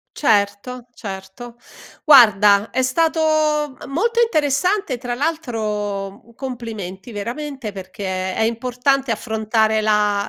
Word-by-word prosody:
Certo, 215 +1 0
certo. 200 +3 -9 0.5
Guarda 210 - +6
è 260 - 0
stato, 320 +6 +1 0.6
m - - -9
molto 460 +10 0
interessante, 315 - +1
tra 245 0 -4
l'altro 215 -9 -3
u 235 - -19
complimenti 230 -5 -7
veramente, 245 +3 -5
perché 190 -1 -5
è - - -2
importante 250 +3 0
affrontare 220 0 0
la 210 -1 +1
230 Hz, 105 wpm, -20 LUFS, 205-270 Hz, 0.6 s, Guarda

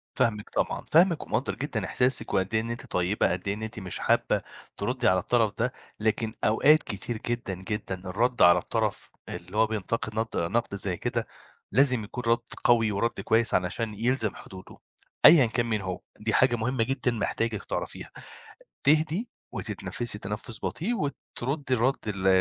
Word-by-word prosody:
فاهمِك 105 -2 0
طبعًا، - - -1
فاهمِك 170 0 +5
ومقدّر - - -1
جدًا - - -3
إحساسِك 125 +1 +1
وقد 95 +2 0
إيه 110 - +3
إن 115 +1 -4
أنتِ 120 - -6
طيبة، 90 +1 +1
قد 90 +2 -4
إيه 100 - +1
إن 105 - -7
أنتِ 110 0 -6
مش 95 -2 -4
حابّة - - +2 0.4
ترُدي 125 +3 0
على 95 0 +4
الطرف 110 +1 +1
ده، 125 +3 0 0.3
لكن 110 +1 0
أوقات 150 +9 +5
كتير 110 +2 -4
جدًا، 120 -5 -2
جدًا 95 -4 -4
الرَد 120 +6 0
على 85 0 +7
الطرف - - -2 0.2
اللي 90 +4 -7
هو 110 0 +5
بينتقد 110 +1 -2
ند 115 - 0 0.2
نَقْد 115 -3 0
زي 95 -2 -1
كده 120 -2 -2 0.4
لازم 125 -1 +4
يكون 125 +4 -6
رَد 115 +1 +4 0.2
قوي 115 -3 +4
ورد 115 +4 -1
كويّس 115 +1 +2
علشان 100 +5 0
يلزم 115 0 0
حدوده، 95 -1 -12 0.5
أيًا 155 -6 +9
كان 120 +1 0
مين 110 -3 -1
هو، 95 -1 -4 0.2
دي 110 0 -1
حاجة 130 -2 +4
مهمّة 115 +1 0
جدًا 130 +1 0
محتاجِك 115 -1 -2
تعرفيها. - - -5 0.8
تهدي 155 - +3 0.2
وتتنفِّسي 120 -4 -4
تنفُّس 105 +3 -6
بطيء 210 +9 -1
وترُدّي 140 - -3
الرَد 125 +3 +2
ال 100 -2 -2
115 Hz, 165 wpm, -27 LUFS, 105-125 Hz, 0.8 s, أيًا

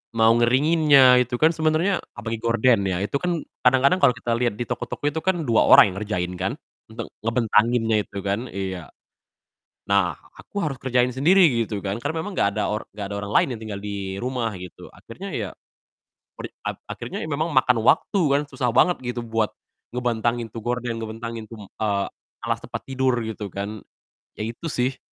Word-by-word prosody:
mau 115 0 +5
ngeringinnya, 130 +1 +5
itu 120 0 -5
kan 160 +1 +4
sebenernya 160 +5 +1 0.2
apalagi 115 -1 -4
gorden 115 0 +3
ya 90 -2 0
itu 105 - -3
kan 175 -3 -1 0.2
kadang-kadang 130 +7 +4
kalau 125 - +5
kita 120 +1 -4
liat 120 -3 0
di 120 - -3
toko-toko 120 +3 -5
itu 160 - -3
kan 175 0 0
2 115 -5 +3
orang 100 - +8
yang - - -11
ngerjain 90 -4 -2
kan, 95 +4 0 0.4
untuk 115 0 -6 0.2
ngebentanginnya 115 0 +2
itu 100 - -11
kan. 100 +5 -2
Iya. 95 -3 -5 1.0
Nah, 95 -6 +2 0.2
aku 205 - -6
harus 140 -3 -3
kerjain 125 -1 +2
sendiri 175 +9 +5 0.2
gitu 105 -1 -4
kan, 100 +2 -1
karena 145 +5 -2
memang 205 +4 -6
enggak 100 - +3
ada 105 - +1
or 105 - -4
enggak 105 -1 -5
ada 100 - -4
orang 100 - -7
lain - - +4
yang - - -13
tinggal 105 -3 -5
di 100 -2 -5
rumah 125 -2 -1
gitu, 90 0 -11
akhirnya 185 +13 -9
ya 105 -7 -3 0.9
per - - -6
ap - - -3
akhirnya - - -6
memang 155 +2 -1
ya - - -5
makan 125 -2 +2
waktu 195 - +3
kan, 140 - +3
susah 125 -4 -1
banget 175 +9 +3
gitu 125 -1 -4
buat 110 -1 0 0.4
ngebentangin 120 -2 -1
tuh 115 - -6
gorden, 120 0 -3
ngebantangin 115 0 -6
tuh, 110 -3 -10
eee, 100 0 -1 0.4
alas - - -1
tempat - - -6
tidur, 130 -1 0
gitu 110 -2 -5
kan. 100 +2 -5 0.5
Ya - - -8
itu 115 +8 -9
sih. 130 -4 -1
120 Hz, 185 wpm, -23 LUFS, 105-130 Hz, 1.0 s, orang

